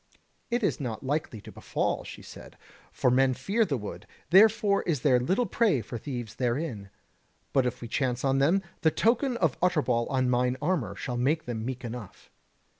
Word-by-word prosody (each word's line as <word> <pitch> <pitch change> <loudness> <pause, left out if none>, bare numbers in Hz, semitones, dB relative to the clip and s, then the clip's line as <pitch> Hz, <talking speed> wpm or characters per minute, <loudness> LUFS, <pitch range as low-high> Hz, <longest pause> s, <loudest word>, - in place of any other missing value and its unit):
"It 240 0 0
is - - +1
not 125 -1 -5
like 150 +4 -1
to 110 -4 -10
befall," - - -2
she - - -10
said, - - -12 0.3
"for 125 - +1
men 130 0 +3
fear 200 - +1
the 140 -8 -1
wood, 105 -3 -8 0.2
therefore 205 +1 +5
is 150 -7 0
there 130 -4 +4
little 190 - +1
prey 205 - +2
for 115 +2 -7
thieves 120 -4 -5
therein: 120 -5 -2 0.6
but 130 -2 +3
if 125 - -4
we 120 - -6
chance 130 +1 -1
on 135 0 +2
them, 170 +8 +3 0.2
the 160 - +5
token 240 - +1
of 165 - 0
Utterbol 145 -10 +1
on 130 -1 +1
mine 125 +1 +1
armour 170 - -1
shall 125 -2 -4
make 145 +6 +1
them 115 -2 -4
meek 130 +1 -5
enough." 115 -4 -9
135 Hz, 185 wpm, -28 LUFS, 120-175 Hz, 0.6 s, therefore